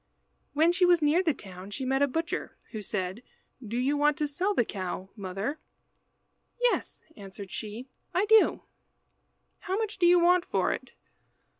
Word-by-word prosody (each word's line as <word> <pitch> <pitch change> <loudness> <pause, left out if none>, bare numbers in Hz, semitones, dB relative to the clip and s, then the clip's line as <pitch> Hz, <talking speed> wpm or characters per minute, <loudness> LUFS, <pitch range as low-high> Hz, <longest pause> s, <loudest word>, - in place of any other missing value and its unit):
When 320 +3 +4
she 365 +1 +1
was 350 -3 +5
near 300 +5 +4
the 340 -4 +2
town 190 -6 -10
she 260 +6 -5
met 270 +1 +1
a 285 - +5
butcher, 325 +5 -3
who 215 - -5
said 190 +1 -3 0.4
"Do 230 +1 -4
you 265 +4 +1
want 295 0 +2
to 300 - 0
sell 365 +8 -1
the 240 - +3
cow, 190 -1 -5
mother?" 200 +8 -4 1.0
"Yes," - - 0
answered 195 -1 -10
she, 220 +4 -6 0.2
"I 375 +3 +2
do." 440 0 +5 1.0
"How 380 +1 -2
much 435 -2 -3
do 350 - +5
you 350 0 +6
want 350 +1 +4
for - - 0
it?" - - -8
285 Hz, 165 wpm, -28 LUFS, -, 1.0 s, you